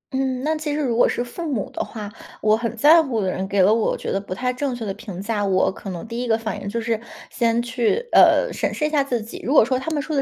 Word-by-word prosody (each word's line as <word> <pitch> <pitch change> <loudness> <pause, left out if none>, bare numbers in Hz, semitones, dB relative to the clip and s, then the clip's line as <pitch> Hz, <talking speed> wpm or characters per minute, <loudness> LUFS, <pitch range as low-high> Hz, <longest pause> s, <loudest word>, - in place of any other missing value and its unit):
嗯， 260 -1 -1
那 310 +2 +1
其 305 -1 -3
实 - - -2
如 245 -5 0
果 245 - +4
是 240 - -1
父 310 +6 -6
母 230 -7 -2
的 - - -3
话 210 -2 -8 0.3
我 215 0 +4
很 230 +1 -3
在 310 +8 +7
乎 260 -8 -2
的 190 -2 0
人 190 +1 -3
给 200 -1 +2
了 205 +4 +5
我 225 -1 +1
觉 - - -4
得 195 - -1
不 185 -2 -6
太 250 +2 -1
正 260 0 -2
确 230 -2 -5
的 195 - -3
评 195 -4 -9
价， 205 0 -2
我 190 -1 +2
可 195 - -9
能 180 +4 -6
第 235 +2 -4
一 250 - -3
个 225 -1 +3
反 220 -2 -5
应 200 - -5
就 230 - -2
是 225 -1 -2 0.3
先 235 -1 +1
去， 240 - +1 0.2
呃， - - +5
审 - - -1
视 300 - -1
一 - - +1
下 295 -3 +3
自 250 -4 -1
己。 225 - -9
如 265 - 0
果 275 - +7
说 255 +1 0
他 265 - -4
们 310 -2 -1
说 310 - -3
的 275 - +2
235 Hz, 325 characters per minute, -22 LUFS, 215-270 Hz, 0.3 s, 在